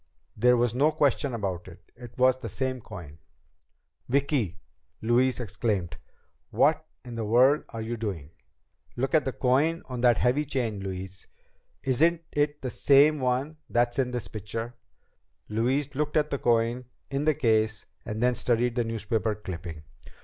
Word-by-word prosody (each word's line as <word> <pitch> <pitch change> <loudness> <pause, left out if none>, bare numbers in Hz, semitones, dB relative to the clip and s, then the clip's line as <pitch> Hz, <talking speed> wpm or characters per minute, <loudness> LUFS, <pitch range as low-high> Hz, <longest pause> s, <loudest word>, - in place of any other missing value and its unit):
There 125 +3 +4
was 120 -1 +2
no 145 +5 +3
question 140 -3 +1
about 95 -5 -3
it. 85 -1 -15
It 120 0 -12
was 130 0 +4
the - - -6
same 130 -1 -2
coin! 85 -9 -10 0.9
"Vicki," 135 - +1 0.4
Louise 125 +3 +2
exclaimed, 100 -6 -2 0.5
"what - - +2 0.2
in 120 - -8
the 115 -1 -3
world 125 +7 +4
are 115 -1 -5
you 115 +1 -4
doing?" 95 -10 -5 0.6
"Look 130 +5 -2
at 155 - +4
the 130 - 0
coin 140 +7 +1
on 125 -2 -5
that 120 -2 +5
heavy 125 +5 +2
chain, 120 -7 -2
Louise. 95 0 -7 0.6
Isn't 165 +6 +2
it 145 0 0
the 130 - -2
same 145 +4 +5
one 130 +4 -1
that's 120 +1 +1
in 130 -2 +2
this 125 -1 -4
picture?" 115 +3 -5 0.8
Louise 130 +6 0
looked 150 +2 -1
at 150 0 +1
the 140 - -1
coin 120 +1 +1 0.3
in 140 +2 -1
the 155 -1 +3
case 110 -4 +1 0.2
and 110 +2 -3
then 125 0 +4
studied 120 0 +1
the 120 - +1
newspaper 110 -1 -1
clipping. 85 -6 -7
120 Hz, 155 wpm, -27 LUFS, 110-135 Hz, 0.9 s, that